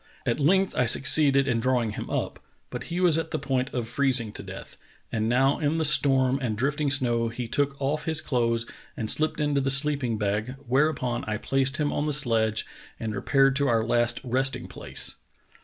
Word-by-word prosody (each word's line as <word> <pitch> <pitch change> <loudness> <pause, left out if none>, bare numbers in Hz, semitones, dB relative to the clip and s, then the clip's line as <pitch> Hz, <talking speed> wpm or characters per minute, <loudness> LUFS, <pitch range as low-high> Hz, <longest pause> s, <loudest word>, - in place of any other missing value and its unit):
At 120 - -1
length 190 +6 +2
I 125 -1 +1
succeeded 140 +2 +4
in 120 -3 +1
draw 125 0 +1
ing 110 - -3
him - - -7
up, - - -3 0.3
but 125 0 -6
he 170 +1 -4
was 170 -3 +3
at 160 - -4
the - - -2
point 135 -1 -2
of 120 -3 -3
freezing 125 -4 0
to - - -7
death, - - -10 0.4
and 110 0 -1
now 135 +3 +2
in 155 +1 0
the 160 - +1
storm 135 -3 +3
and 110 -5 -2
drifting 140 +4 0
snow 120 -4 +1
he 115 +1 -5
took 140 +3 -1
off 150 +2 -2
his 160 -1 +1
clothes 115 -5 -1 0.3
and 110 -2 +2
slipped 155 0 +1
into 145 -2 +1
the 135 - -1
sleeping 135 -4 +2
bag, 105 +4 -2
where 135 +5 +2
upon 125 -5 -3
I 105 0 -2
placed 135 +4 0
him 150 -2 -1
on 145 - -1
the 150 - 0
sledge 115 -5 +1 0.3
and 110 -1 -4
repaired 135 +5 +2
to 140 0 +1
our 115 -1 +2
last 120 0 +1
resting 130 +1 -1
place. - - -3
130 Hz, 205 wpm, -26 LUFS, 120-145 Hz, 0.4 s, succeeded